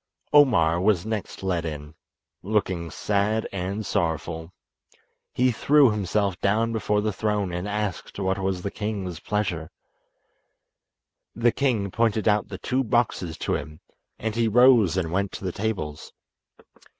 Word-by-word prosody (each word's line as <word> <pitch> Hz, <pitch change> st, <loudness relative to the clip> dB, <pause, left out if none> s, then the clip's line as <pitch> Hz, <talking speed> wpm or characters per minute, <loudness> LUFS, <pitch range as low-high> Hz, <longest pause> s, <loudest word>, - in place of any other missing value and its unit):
Omar 90 Hz, -, +5 dB
was 100 Hz, -2 st, +2 dB
next 110 Hz, -3 st, -4 dB
led 90 Hz, -3 st, 0 dB
in, 75 Hz, -2 st, -6 dB, 0.5 s
looking 95 Hz, -4 st, -1 dB
sad 105 Hz, +6 st, 0 dB
and 100 Hz, +3 st, -3 dB
sorrowful. 80 Hz, -3 st, -2 dB, 0.8 s
He 125 Hz, 0 st, +2 dB
threw 140 Hz, +2 st, +4 dB
himself 100 Hz, -2 st, -1 dB
down 115 Hz, +3 st, +1 dB
before 105 Hz, -1 st, 0 dB
the 105 Hz, 0 st, -1 dB
throne 105 Hz, -2 st, -1 dB
and 90 Hz, +3 st, -3 dB
asked 105 Hz, -3 st, -3 dB
what 95 Hz, 0 st, 0 dB
was 95 Hz, -2 st, -2 dB
the 100 Hz, -, -3 dB
king's 100 Hz, -6 st, -4 dB
pleasure. 90 Hz, -6 st, -2 dB, 1.7 s
The 120 Hz, +1 st, +3 dB
king 115 Hz, -9 st, 0 dB
pointed 110 Hz, -1 st, +1 dB
out 105 Hz, -1 st, +3 dB
the -, -, -7 dB
two 130 Hz, +1 st, -1 dB
boxes 110 Hz, -8 st, 0 dB
to -, -, 0 dB
him, 75 Hz, +1 st, -5 dB, 0.4 s
and 110 Hz, 0 st, -3 dB
he 115 Hz, -1 st, +2 dB
rose 115 Hz, -5 st, +5 dB
and 85 Hz, -3 st, -1 dB
went 100 Hz, +2 st, 0 dB
to -, -, -7 dB
the 90 Hz, -, -1 dB
tables. 90 Hz, -8 st, -4 dB
100 Hz, 140 wpm, -25 LUFS, 90-110 Hz, 1.7 s, Omar